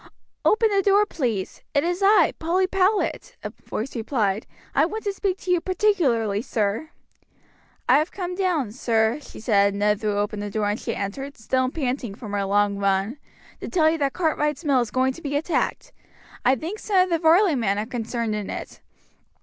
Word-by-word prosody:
"Open 445 +1 +4
the 395 -1 +3
door, 400 +2 +4
please. 235 - -3
It 285 - +3
is 350 +3 -1
I, 395 -4 +5
Polly 355 +4 +1
Powlett," 395 +6 0
a - - -4
voice 245 +5 -6
replied. 220 -3 -1 0.3
"I 280 - +4
want 430 +7 -2
to 405 - -1
speak 390 -1 -1
to 370 - -2
you 355 -2 +3
particularly, 280 - +1
sir. 225 +3 -2 1.0
"I 260 +3 +6
have 310 +3 -1
come 360 -2 -4
down, 355 - 0
sir," 225 +1 +1
she - - -12
said 200 -3 +2
as - - -4
Ned 210 +1 +1
threw 210 -2 0
open 205 +1 -1
the 205 0 -4
door 210 0 -1
and 205 +2 -1
she - - -3
entered, 270 +8 -5
still 255 +3 0
panting 255 -7 -3
from 215 -2 -8
her 200 -1 -1
long 200 0 +1
run, 200 +6 0 0.4
"to - - -6
tell 315 -3 +3
you 325 - -2
that 275 -2 0
Cartwright's 305 -2 -1
mill 275 -4 +3
is 235 - -2
going 260 +3 +1
to 335 - -12
be 285 -2 -3
attacked. 320 +4 -1 0.5
I 255 +2 +4
think 340 - -6
some 405 -3 -1
of 365 - +1
the 335 - +2
Varley 335 +3 +5
men 215 -7 0
are 210 - -1
concerned 230 -1 -3
in 210 -2 -4
it. - - -7
265 Hz, 200 wpm, -24 LUFS, 215-350 Hz, 1.0 s, I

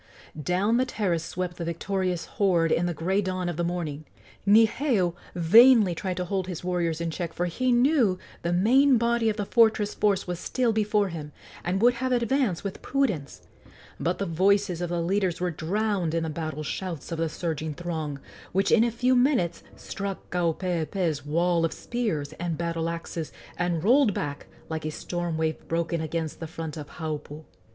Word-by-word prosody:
Down 190 +8 +1
the 255 - +2
terrace 185 -9 -1
swept 175 0 -4
the 170 - -4
victorious 180 +1 -2
horde 175 -5 +1
in 175 - +2
the 175 - -1
gray 190 +6 +1
dawn 185 -2 -2
of 175 - -2
the 175 - -1
morning. 165 -4 -3 0.4
Niheu 220 - +4 0.2
vainly 215 +3 +7
tried 185 +1 -3
to 180 - -1
hold 190 0 -2
his 180 -3 -5
warriors 175 -3 -1
in 170 -1 -2
check, 170 0 -4
for 175 - -1
he 250 +9 0
knew 245 -6 +3 0.2
the 170 - -1
main 250 +9 +5
body 235 0 +2
of 215 - -2
the 205 - -2
fortress 220 -2 +3
force 205 -2 +1
was 175 -1 -4
still 245 +1 0
before 210 -2 +1
him, 155 -3 -7 0.3
and 190 +4 0
would 245 +1 +6
have 260 0 0
advanced 240 -5 +1
with 200 -2 -5
prudence; 210 - -1 0.6
but 175 +2 0
the 200 - -2
voices 190 +1 +2
of 175 - -2
the 175 0 -1
leaders 185 -1 0
were 180 0 0
drowned 185 +1 -1
in 165 - 0
the 160 - -2
battle 155 -1 -4
shouts 170 0 -5
of 165 - -3
the 165 -1 0
surging 160 -2 -3
throng, 160 -4 -4 0.3
which 195 +2 +2
in 230 - +6
a 235 - +2
few 250 +3 +2
minutes 245 - +2
struck 200 -1 -6
Kaupeepee's 170 -2 -1
wall 170 +2 +2
of 165 - 0
spears 210 -13 -3
and 170 -2 -2
battle 165 -1 -2
axes, 165 -1 -5 0.2
and 175 -2 -1
rolled 245 0 +4
back 145 -1 -4 0.2
like 160 -1 -4
a 155 - -2
storm 175 +1 -3
wave 160 -1 -1
broken 170 0 -1
against 160 0 -3
the 165 - -5
front 160 0 -6
of 150 -2 -7
Haupu. 155 -1 -5
175 Hz, 185 wpm, -26 LUFS, 165-210 Hz, 0.6 s, vainly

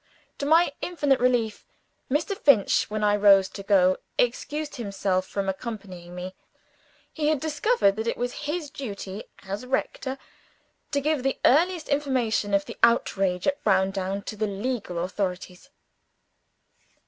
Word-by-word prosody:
To 280 - -2
my 325 -1 +4
infinite 290 -7 +1
relief, 240 -4 +1 0.5
Mr. 310 +9 0
Finch, 270 - +3
when 215 0 -2
I 205 0 +4
rose 200 -2 +6
to 200 - -8
go, 190 -2 +4 0.2
excused 295 +5 -1
himself 195 -4 -1
from 200 -1 -3
accompanying 190 -4 -6
me. 180 +1 -6 0.8
He 300 -2 -1
had 310 -2 +2
discovered 310 - +2
that 220 +1 -3
it - - -1
was 245 0 -2 0.2
his 305 -2 -3
duty, 200 -6 -6 0.2
as 200 +4 -5
rector, 265 +1 -2 0.7
to 285 - 0
give 300 -1 0
the 270 +1 0
earliest 335 +4 +3
information 255 -8 +1
of 200 0 +1
the - - -9
outrage 195 -6 +2
at 285 0 0
Browndown 195 0 +1
to 215 - -6
the 215 0 -1
legal 205 -2 -3
authorities. 185 +4 -4
220 Hz, 140 wpm, -26 LUFS, 195-280 Hz, 0.8 s, rose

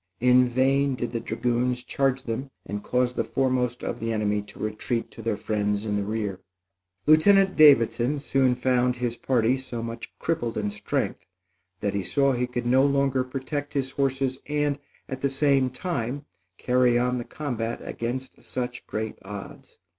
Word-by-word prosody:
In 125 +1 +5
vain 135 +2 +2
did 120 -1 -3
the 115 - -2
dragoons 120 +2 -1
charge 135 -1 0
them 130 +2 -4 0.2
and 105 0 -4
cause 125 0 +1
the - - 0
foremost 125 -2 0
of 120 - -3
the 115 0 -2
enemy 105 -1 0
to 105 - -14
retreat 110 +2 -3
to - - -10
their 110 -2 -1
friends 105 -1 -1
in 105 -1 -1
the 100 - 0
rear. 105 -2 -3 0.7
Lieutenant 190 +5 +5
Davidson 125 -2 +5
soon 135 -3 +2
found 125 0 +2
his 120 -1 -2
party 125 0 +2
so 120 -3 -6
much 115 0 -6
crippled 120 -9 -2
in 105 -1 -1
strength 105 0 -3 0.5
that 100 - 0
he 100 - 0
saw 140 +8 +2
he 125 0 0
could 120 -1 -4
no 130 +2 +4
longer 140 -2 +2
protect 145 +3 -5
his 135 -1 0
horses 135 -1 0
and 145 -1 0 0.3
at 130 0 -6
the 140 - +2
same 135 -1 +2
time 140 -1 -3 0.3
carry 125 -1 +3
on 125 +1 +1
the - - -3
combat 120 -5 -4
against 130 +3 -5
such 125 -1 -5
great 110 0 -4
odds. 100 0 -9
125 Hz, 170 wpm, -26 LUFS, 115-135 Hz, 0.7 s, In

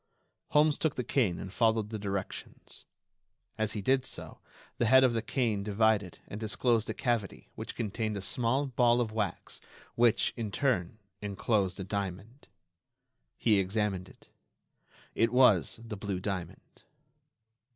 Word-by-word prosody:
Holmes 150 0 +3
took 160 -3 0
the 125 - -2
cane 110 -10 +1
and 95 - -7
followed 110 -2 +2
the 110 - -4
directions. 100 -1 -6 0.7
As 110 0 -1
he 105 - -4
did 130 +3 +3
so, - - -5 0.4
the 120 - +3
head 130 +3 +7
of 125 -2 +4
the 115 - 0
cane 115 -3 0
divided 105 -2 +1
and 105 - -7
disclosed 115 +1 +1
a - - -1
cavity 120 -6 -2
which - - -7
contained 110 -1 -2
a - - -4
small 120 +8 +1
ball 120 -2 +3
of 115 -3 0
wax 110 -2 -3 0.3
which, 120 -2 +3
in 115 -3 -3
turn, 110 -4 0 0.2
enclosed 100 -1 0
a - - -2
diamond. 100 +6 -5 0.9
He 105 -4 +3
examined 95 -1 -1
it. - - -20 0.9
It 115 0 +2
was 115 - +4
the 110 -2 -6
blue 95 -1 -3
diamond. 95 -2 -6
110 Hz, 145 wpm, -30 LUFS, 100-120 Hz, 0.9 s, head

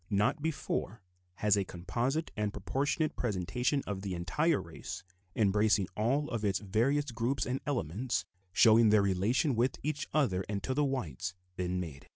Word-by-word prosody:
Not 105 +8 +2
before 140 -8 -2 0.4
has 105 +1 +3
a 100 - +1
composite 120 - -2
and 105 -2 -1
proportionate 145 - -1
presentation 125 - 0
of 100 -2 -4
the 95 -2 -3
entire 145 - +1
race, 85 -2 -7 0.3
embracing 105 -1 +3
all 135 +7 +1
of 115 -2 -2
its 100 -3 +2
various 125 +8 +1
groups 120 +4 0
and 130 +2 -2
elements, 110 - -1 0.3
showing 110 +3 +6
their 105 -1 +5
relations 110 - +2
with 125 +3 +1
each 150 0 -2
other 110 -12 +2
and 100 -2 -2
to 130 - -1
the 145 +3 +2
whites, 100 - -2 0.2
been 90 -1 -1
made. 80 -6 -7
110 Hz, 160 wpm, -32 LUFS, 95-135 Hz, 0.4 s, showing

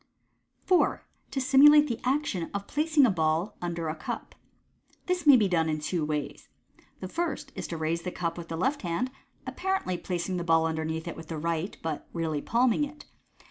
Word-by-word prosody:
4. 365 -2 +2 0.3
To 275 - -2
Simulate 285 +3 +7
the 235 -4 -2
Actton 255 - -1
of 200 0 -3
Placing 305 +1 +3
a 235 - +3
Ball 165 +3 0
under 170 -2 -3
a 155 - -1
Cujp. - - -6 0.4
— - - -37
This 360 -3 -1
may 280 -3 +10
be 210 -4 +3
done 165 -3 +1
in 155 0 -1
two 160 +2 -2
ways. 150 -1 -4 0.5
The 185 - -4
first 335 - -3
is - - -5
to 165 - -5
raise 160 +1 -1
the 180 - -4
cup 170 -2 -3
with 170 -1 -8
the 165 - -4
left 265 - 0
hand, 185 +9 -2 0.3
apparently 375 - -2
placing 180 +1 -3
the 175 - -2
ball 165 -1 +3
underneath 160 0 -2
it 170 - -4
with 165 -1 -10
the 160 - -5
right, 165 +4 -2
but 160 -2 -4
really 160 -3 -2
palming 245 - +2
it. 295 +1 -7
175 Hz, 195 wpm, -28 LUFS, 160-260 Hz, 0.5 s, may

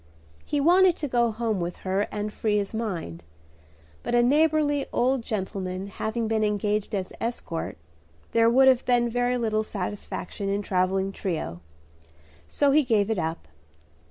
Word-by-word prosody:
He 290 - -1
wanted 355 +4 +5
to 295 - -3
go 240 -2 +2
home 220 -2 -1
with 175 0 -3
her 190 +2 0
and 210 0 -3
free 210 -2 0
his 200 +1 -2
mind; 180 - -4 0.8
but 240 - -1
a 240 - +5
neighborly 290 +1 +2
old 255 +1 +1
gentleman 190 -3 -4
having 220 +3 -2
been 220 -1 +1
engaged 210 0 0
as 190 -2 -4
escort, 225 - -4 0.5
there 230 0 +4
would 265 +3 +5
have 260 -2 +5
been 240 -1 +2
very 245 +1 +1
little 220 -2 0
satisfaction 200 -1 -5
in 200 +1 0
a - - -9
travelling 190 +1 0
trio; 155 - -4 0.9
so 285 -1 +2
he 305 +2 +5
gave 225 -5 +1
it 215 - 0
up. 160 - -3
215 Hz, 155 wpm, -26 LUFS, 195-245 Hz, 0.9 s, wanted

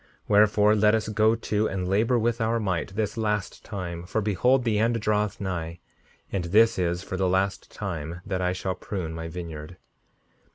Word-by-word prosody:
5:62 - - -31 0.2
Wherefore, 105 0 +5
let 105 +1 +4
us 110 -1 -1
go 110 +1 +3
to 110 -1 0
and 95 -2 -3
labor 110 +6 +2
with 120 +1 0
our 115 +1 +1
might 95 -2 -2
this 105 0 -2
last 105 -3 -2
time, 90 -5 -5
for 95 +5 -2
behold 125 +5 +2
the 110 -3 +1
end 115 +1 +2
draweth 105 -1 0
nigh, 85 -4 -4 0.5
and 95 -3 -1
this 110 +4 +4
is 85 0 0
for 95 - -5
the 95 -1 +1
last 95 +2 0
time 85 -4 -5
that 95 -2 -2
I 90 0 +1
shall 95 +1 -2
prune 90 -2 -5
my 80 0 -5
vineyard. 80 -1 -7
100 Hz, 190 wpm, -26 LUFS, 90-110 Hz, 0.5 s, Wherefore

